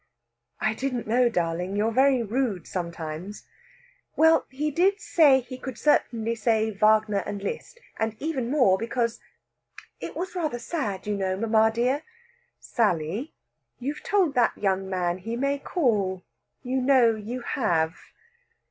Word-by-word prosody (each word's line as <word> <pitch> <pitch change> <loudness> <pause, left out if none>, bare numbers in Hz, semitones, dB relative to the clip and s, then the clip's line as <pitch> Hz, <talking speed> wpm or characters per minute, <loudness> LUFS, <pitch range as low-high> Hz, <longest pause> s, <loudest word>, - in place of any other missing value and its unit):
"I 220 - +1
didn't 250 -1 -3
know, 240 +2 +3
darling. 175 -1 -2
You're 215 +2 +1
very 260 0 +3
rude 220 - -1
sometimes." 170 +2 -5 0.7
"Well, 320 0 +4
he 290 +2 -3 0.2
said 290 -10 +4
he 255 +1 -9
could 260 -2 -7
certainly 230 -6 +1
say 220 -1 +1
Wagner 215 0 +3
and 200 -1 -6
Liszt, 345 - -5 0.2
and 220 -1 -1
even 275 -6 -2
more, 250 -10 +3
because 235 0 -1 0.8
it - - -7
was 365 +1 -4
rather 315 -9 -2
sad, 235 - -4
you 210 0 -1
know, 190 -1 -1
mamma 220 +1 +3
dear 250 +5 0 0.4
" 485 - -43 0.2
"Sally, 205 - 0 0.4
you've 280 +4 -4
told 380 -8 +1
that 245 -3 +2
young 190 -1 -1
man 180 -1 -1
he 225 +5 -4
may 275 +3 0
call; 205 - 0 0.4
you 260 +1 -1
know 255 -3 +5
you 220 +4 -6
have!" 165 -10 0
230 Hz, 140 wpm, -26 LUFS, 200-265 Hz, 0.8 s, know